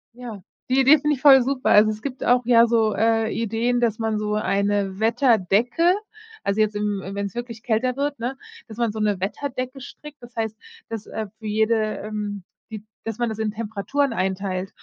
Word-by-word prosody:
Ja, 235 -5 -8 0.3
die 260 +1 +3
Idee 275 +4 +7
finde 295 +1 +1
ich 260 - -13
voll 270 -2 +8
super. 260 +1 -1
Also, 215 +1 +6
es 215 0 -4
gibt 265 -1 -5
auch 245 0 +3
ja 235 -1 +6
so, 225 -2 +2
äh, 225 0 +2
Ideen, 230 +2 0
dass 230 -3 +1
man 220 -1 -1
so 210 0 -1
eine 200 -2 0
Wetterdecke 235 - +3 0.5
Also, 200 +2 -1
jetzt, 215 -1 +2
im 205 -1 -1
im 195 +1 -7
wenn's 200 -1 -4
wirklich 240 -2 -6
kälter 245 +2 0
wird, 285 +1 -2
ne, 245 +3 -3 0.3
dass 220 -2 -11
man 235 -2 0
so 215 - -6
'ne 210 -3 0
Wetterdecke 255 +6 -4
strickt, 295 +2 -12
das 240 +1 -13
heißt, 220 -1 -3 0.3
dass, 225 -2 -5
äh, 220 -1 -5
für 220 - -13
jede, 220 +2 +2 0.2
ähm 210 -2 -5 0.3
die 215 -2 -7 0.2
dass 225 -1 -5
man 240 - +1
das 220 - -5
in 220 -1 -1
Temperaturen 225 +6 -2
einteilt 190 -1 -2
225 Hz, 200 wpm, -23 LUFS, 210-245 Hz, 0.5 s, voll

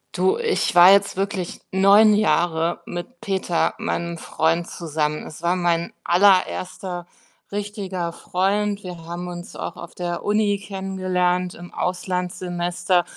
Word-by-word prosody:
Du, 400 +4 +2
ich 465 -2 0
war 175 +2 +9
jetzt 200 -1 +3
wirklich 195 -2 -3
9 200 +3 +6
Jahre 170 -5 +1
mit 175 +9 -7
Peter, 190 -3 0
meinem 170 0 -2
Freund 165 +1 0
zusammen. 155 -3 -2
Es 155 - -11
war 175 +2 +2
mein 170 -1 0
allererster 185 -1 +2 0.5
richtiger 200 -4 -4
Freund. 200 +3 0
Wir 175 -3 -8
haben 175 +1 -5
uns 175 0 -8
auch - - -5
auf 170 - -10
der 175 -1 -4
Uni 205 -1 +2
kennengelernt 185 -2 -1
im 175 0 -11
Auslandssemester. 180 0 -1
180 Hz, 130 wpm, -22 LUFS, 175-195 Hz, 0.5 s, war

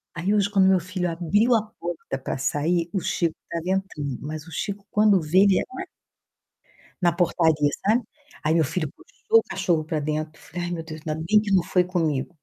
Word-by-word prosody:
Aí 185 +6 0
hoje 205 -1 +2
quando 195 -2 +4
meu 190 -1 +5
filho 180 0 -3
abriu 205 +9 +2
a 220 - +3 0.2
porta 165 -5 -4
pra 130 - -4
sair, 165 +5 0
o 190 - +1
Chico 165 -1 0 0.2
estava 165 -1 -3 0.2
entrando. 145 -9 -6
Mas 155 +2 -6
o - - -11
Chico 200 +4 -4
quando 210 -2 +4
vê 165 +4 +2
ele 195 -1 +5
en - - -1 1.4
Na 175 -1 +4
portaria, 160 -4 +2 0.2
sabe. 225 +4 +3 0.4
Aí 155 +1 +2
meu 165 - +4
filho 155 -1 -2
puxou 455 -2 +1
o - - -4
cachorro 165 -3 0
pra 155 -1 -2
dentro, 155 +1 -3
falei: 175 -1 -6
"Ai, 175 - -4
meu 165 -2 -3
Deus, 155 -1 -9
ainda 155 - 0
bem 210 +2 +5
que 210 -2 -4
não 185 -3 +4
foi 180 0 +2
comigo". 165 -7 -1
175 Hz, 205 wpm, -24 LUFS, 155-195 Hz, 1.4 s, meu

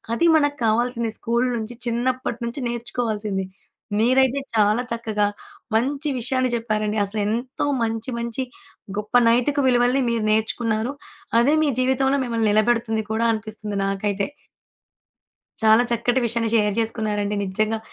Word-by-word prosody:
అది 335 - +2
మనకు 290 -1 +1
కావాల్సింది. 235 +1 +1
స్కూల్ 235 +2 +1
నుంచి 225 +1 -5
చిన్నప్పటి 240 0 -1
నుంచి 235 +4 -4
నేర్చుకోవాల్సింది. 220 -4 -2 0.5
మీరైతే 260 +4 +3 0.2
చాలా 215 +2 +3
చక్కగా, 220 -3 0 0.5
మంచి 275 +6 0
విషయాన్ని 255 +2 0
చెప్పారండి. 215 -2 -1
అసలు 200 +2 -2
ఎంతో 240 +6 -2 0.2
మంచి, 225 +2 -2
మంచి 235 +2 -3 0.5
గొప్ప 210 +3 -4
నైతిక 250 +5 +2
విలువలని 245 +1 +3
మీరు 230 -2 0
నేర్చుకున్నారు. 220 +2 0 0.5
అదే 260 +6 +4
మీ 300 - +2
జీవితంలో 265 +2 +2
మిమ్మల్ని 230 -3 0
నిలబెడుతుంది 220 +1 +2
కూడా 225 +1 +1
అనిపిస్తుంది 215 -2 -4
నాకైతే. 195 0 -1 1.4
చాలా 220 +2 +6
చక్కటి 240 +2 +1
విషయాన్ని 230 0 -1
షేర్ 210 -2 +2
జేసుకున్నారండి. 215 -2 -1
నిజ్జంగా 215 +3 -1
230 Hz, 125 wpm, -23 LUFS, 215-245 Hz, 1.4 s, చాలా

